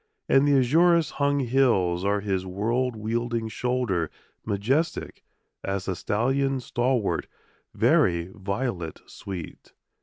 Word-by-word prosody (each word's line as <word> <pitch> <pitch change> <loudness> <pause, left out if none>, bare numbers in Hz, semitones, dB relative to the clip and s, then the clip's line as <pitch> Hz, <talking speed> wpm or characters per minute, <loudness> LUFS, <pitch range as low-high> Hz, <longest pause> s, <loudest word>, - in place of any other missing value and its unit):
And 135 +2 +4
the 145 - +4
azurous 165 +5 +4
hung 140 0 +1
hills 115 -9 +2
are 100 +1 +1
his 95 -2 -1
world 115 +7 -1
wielding 115 +1 -2
shoulder 115 -8 -1 0.3
Majestic 115 +10 -1 0.4
as 95 0 -3
a 95 - -1
stallion 135 +9 0
stalwart, 120 -2 0 0.5
very 85 +1 +2
violet 100 -4 -3
sweet! 90 -5 -9
115 Hz, 110 wpm, -26 LUFS, 95-130 Hz, 0.5 s, And